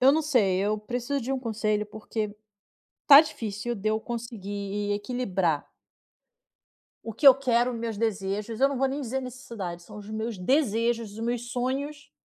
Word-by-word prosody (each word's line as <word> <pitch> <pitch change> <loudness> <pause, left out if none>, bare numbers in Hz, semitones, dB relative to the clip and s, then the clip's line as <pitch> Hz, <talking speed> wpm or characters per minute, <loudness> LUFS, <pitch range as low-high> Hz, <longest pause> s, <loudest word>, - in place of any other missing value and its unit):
eu 265 +2 +7
não 320 - +2
sei, 220 -11 +2
eu 210 +2 0
preciso 245 +6 -3
de 260 +3 -3
um 265 - 0
conselho, 215 -3 -1
porque 210 0 -5 0.7
tá 285 0 +11
difícil 230 -6 -4
de 215 -1 -2
eu 220 - 0
conseguir 205 -3 -4
equilibrar 200 - -1 1.4
o 225 - -5
que 250 +7 0
eu 270 - +12
quero, 250 -2 +1
meus 230 -2 -4
desejos, 210 +1 -2
eu 275 - +6
não 280 - -3
vou 270 +1 +2
nem 275 +2 -3
dizer 265 0 -2
necessidade, 230 -9 -7
são 210 +4 -12
os 210 0 -9
meus 220 +1 -3
desejos, 230 0 +1
os 215 - -9
meus 240 +1 -2
sonhos, 280 +4 -3
230 Hz, 165 wpm, -27 LUFS, 210-255 Hz, 1.4 s, eu